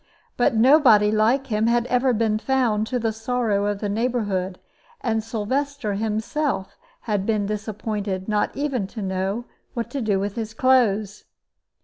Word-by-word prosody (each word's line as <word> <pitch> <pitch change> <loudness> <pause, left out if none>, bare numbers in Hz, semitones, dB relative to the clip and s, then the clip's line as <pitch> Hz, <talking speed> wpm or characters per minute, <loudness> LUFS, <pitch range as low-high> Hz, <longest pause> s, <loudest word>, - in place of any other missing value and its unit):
But 245 0 +2
nobody 225 -4 +6
like 225 +6 +2
him 220 -2 0
had 235 0 +2
ever 250 +1 +2
been 220 -2 +1
found, 235 -4 +1
to 255 - -1
the 225 -2 0
sorrow 220 -3 0
of 205 -1 -2
the 210 - -1
neighborhood; 205 -4 -1 0.4
and 225 -3 0
Sylvester 245 +2 -2
himself 220 +2 -2 0.3
had 205 -4 -1
been 210 -1 0
disappointed, 210 -2 -3
not 210 -1 0
even 275 -8 -1
to 215 +1 -7
know 190 +4 -2 0.3
what 235 -1 -3
to 280 - -3
do 205 -4 +1
with 200 +1 -2
his 220 -1 -4
clothes. 220 -6 +2
220 Hz, 150 wpm, -23 LUFS, 205-245 Hz, 0.4 s, nobody